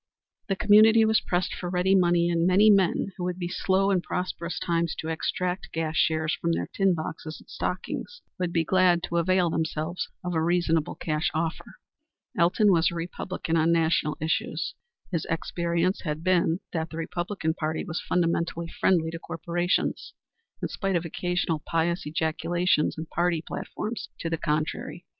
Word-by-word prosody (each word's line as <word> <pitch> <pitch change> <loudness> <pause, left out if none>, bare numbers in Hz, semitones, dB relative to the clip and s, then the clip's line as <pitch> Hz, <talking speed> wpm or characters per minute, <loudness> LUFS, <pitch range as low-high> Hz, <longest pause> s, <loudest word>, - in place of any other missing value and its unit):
The 195 - 0
community 215 +3 +6
was 220 0 +3
pressed 180 0 -1
for 175 - -5
ready 180 +1 +2
money, 175 -2 +4
and 170 0 +2
many 205 +4 +6
men 195 0 +2
who 180 - -4
would 180 0 -2
be 175 -2 -3
slow 190 +2 +1
in 185 -2 +2
prosperous 175 -2 -3
times 170 -1 0
to 160 - -5
extract 180 +3 -2
gas 160 -1 -2
shares 155 0 +2
from 170 0 +1
their - - -1
tin 195 -2 +3
boxes 155 0 -6
and - - -19
stockings 485 - -4 0.2
would 180 -2 -1
be 165 -1 +2
glad 180 0 +3
to 170 - -2
avail 175 0 +2
themselves 160 +2 -2
of 180 0 -2
a 160 - +1
reasonable 165 -2 +1
cash 155 -1 -1
offer. 160 +1 -3 0.6
Elton 185 +5 +4
was 165 -2 +4
a 170 - -7
Republican 170 0 -3
on 165 +1 +3
national 160 -2 +2
issues. 160 +1 -1 0.4
His 170 -4 -1
experience 170 +2 0
had 155 -1 -4
been 180 -1 +2
that 160 -1 -2
the 160 - -8
Republican 175 0 -2
Party 155 -1 -3
was 170 -1 -3
fundamentally 170 -1 0
friendly 165 -3 +1
to 165 - -6
corporations, 175 +3 -2 0.5
in - - +1
spite 195 -2 -1
of 170 0 0
occasional 175 -1 -1
pious 170 +1 0
ejaculations 160 +2 +1
in 160 - -4
party 170 0 0
platforms 220 +2 -5
to 165 - -3
the 165 - 0
contrary. 155 +2 -2
170 Hz, 165 wpm, -26 LUFS, 160-180 Hz, 0.6 s, community